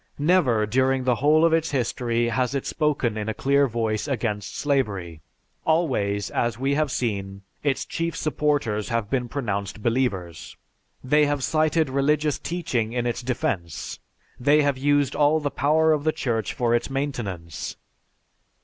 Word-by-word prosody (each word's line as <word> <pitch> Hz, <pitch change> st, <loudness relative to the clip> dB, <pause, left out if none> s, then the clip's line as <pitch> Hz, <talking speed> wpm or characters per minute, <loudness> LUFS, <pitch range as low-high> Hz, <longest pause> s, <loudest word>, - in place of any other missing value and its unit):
Never, 145 Hz, -9 st, +3 dB
during 130 Hz, +3 st, +1 dB
the 125 Hz, -1 st, +3 dB
whole 155 Hz, +3 st, +5 dB
of 165 Hz, -, +3 dB
its 165 Hz, 0 st, +2 dB
history 120 Hz, -2 st, 0 dB
has 125 Hz, +2 st, 0 dB
it 135 Hz, -, -2 dB
spoken 140 Hz, -8 st, 0 dB
in 105 Hz, +1 st, -3 dB
a 110 Hz, -, -3 dB
clear 140 Hz, +1 st, +3 dB
voice 115 Hz, 0 st, -1 dB
against 110 Hz, -6 st, -2 dB
slavery; 100 Hz, -, -1 dB, 0.4 s
always, 125 Hz, -12 st, 0 dB
as 120 Hz, -2 st, 0 dB
we 135 Hz, +3 st, 0 dB
have 155 Hz, 0 st, +1 dB
seen, 100 Hz, -6 st, -3 dB, 0.2 s
its 140 Hz, -2 st, 0 dB
chief 165 Hz, 0 st, -3 dB
supporters 145 Hz, -9 st, 0 dB
have 115 Hz, -3 st, -2 dB
been 125 Hz, -3 st, 0 dB
pronounced 105 Hz, -5 st, -3 dB
believers. 100 Hz, -, -2 dB, 0.5 s
They 150 Hz, +3 st, +3 dB
have 145 Hz, -2 st, -1 dB
cited 155 Hz, +1 st, +2 dB
religious 145 Hz, +2 st, +1 dB
teaching 130 Hz, -10 st, -2 dB
in 120 Hz, -1 st, -1 dB
its 120 Hz, 0 st, -1 dB
defence, 120 Hz, -, -3 dB, 0.4 s
they 145 Hz, +4 st, +4 dB
have 140 Hz, -1 st, +2 dB
used 145 Hz, 0 st, +1 dB
all 150 Hz, +1 st, +3 dB
the 145 Hz, -2 st, -2 dB
power 160 Hz, +3 st, +3 dB
of 150 Hz, -2 st, -1 dB
the 155 Hz, -, +2 dB
Church 120 Hz, -9 st, -2 dB
for 120 Hz, -1 st, 0 dB
its 120 Hz, -, 0 dB
maintenance. 115 Hz, -, -4 dB
130 Hz, 155 wpm, -24 LUFS, 110-145 Hz, 0.5 s, whole